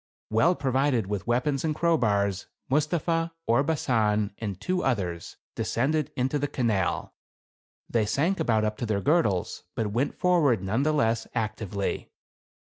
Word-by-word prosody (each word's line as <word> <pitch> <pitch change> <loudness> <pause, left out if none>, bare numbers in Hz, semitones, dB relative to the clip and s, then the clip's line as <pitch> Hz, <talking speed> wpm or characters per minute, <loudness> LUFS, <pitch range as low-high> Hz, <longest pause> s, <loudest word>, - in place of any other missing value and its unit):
Well 155 +12 +4
provided 135 - +1
with 100 0 -4
weapons 130 +3 +1
and 155 -2 0
crowbars, 100 - +1 0.2
Mustapha, 165 +3 +1
Orbasan 115 -6 +1
and 100 -5 -4
two 180 - -1
others, 90 -10 -2 0.2
descended 150 +5 0
into 130 +3 0
the 145 - 0
canal. 115 -8 -1 0.7
They 110 -3 +1
sank 165 - +1
about 110 -2 +2
up 105 0 -2
to 120 - -3
their 105 -2 0
gir 160 - +4
dles, 95 - -2
but 110 -3 -1
went 130 +5 0
forward 150 - +3
none 110 +8 0
the^ 155 +1 +2
less 115 -4 +1
actively. 110 -3 -2
120 Hz, 140 wpm, -27 LUFS, 105-150 Hz, 0.7 s, Well